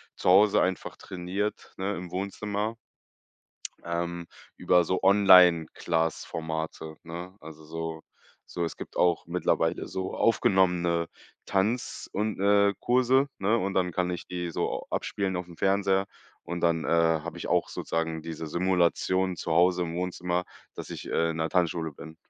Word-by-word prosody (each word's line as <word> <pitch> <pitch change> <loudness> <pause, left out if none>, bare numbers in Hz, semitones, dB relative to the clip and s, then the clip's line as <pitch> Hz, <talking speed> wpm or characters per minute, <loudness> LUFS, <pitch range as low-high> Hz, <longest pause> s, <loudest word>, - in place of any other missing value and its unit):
zu - - 0
Hause 100 +3 +6
einfach 95 0 -2
trainiert, 95 +3 -4
ne, 95 +2 -2
im 90 0 -7
Wohnzimmer 105 +3 -3 1.1
ähm, 85 0 -3 0.3
über 90 -1 +4
so 90 +2 -1
Online-Class-Formate, 80 -4 +3
ne, 85 +3 -8
also 80 -1 -12
so 80 0 -5 0.5
so 85 - -3
es 85 - -4
gibt - - -9
auch 85 -2 +2
mittlerweile 90 +2 0
so 95 0 -4
aufgenommene 90 -6 +2 0.4
Tanz 110 +7 -1
und, 105 0 -2
äh, 100 0 +4
Kurse, 130 +2 +3
ne, 105 +4 +2
und 100 -2 -2
dann 90 -1 +1
kann 90 +1 -1
ich 90 - -6
die 90 -1 -4
so - - -2
abspielen 95 -2 -2
aufm 90 -2 -6
Fernseher 95 0 +2 0.4
und 85 0 -5
dann, 85 -2 +1
äh, - - -5
habe 85 -1 +1
ich - - -5
auch - - +1
sozusagen 80 -1 -3
diese 80 0 -6
Simulation 90 +2 +1
zu 80 - -4
Hause 90 +2 +4
im 85 -1 -3
Wohnzimmer, 90 0 -2 0.3
dass - - -7
ich, - - -7
äh, 85 0 +1
in 80 - -6
'ner 80 0 -1
Tanzschule 85 -3 0
bin. 80 +3 -11
90 Hz, 150 wpm, -27 LUFS, 85-95 Hz, 1.1 s, Hause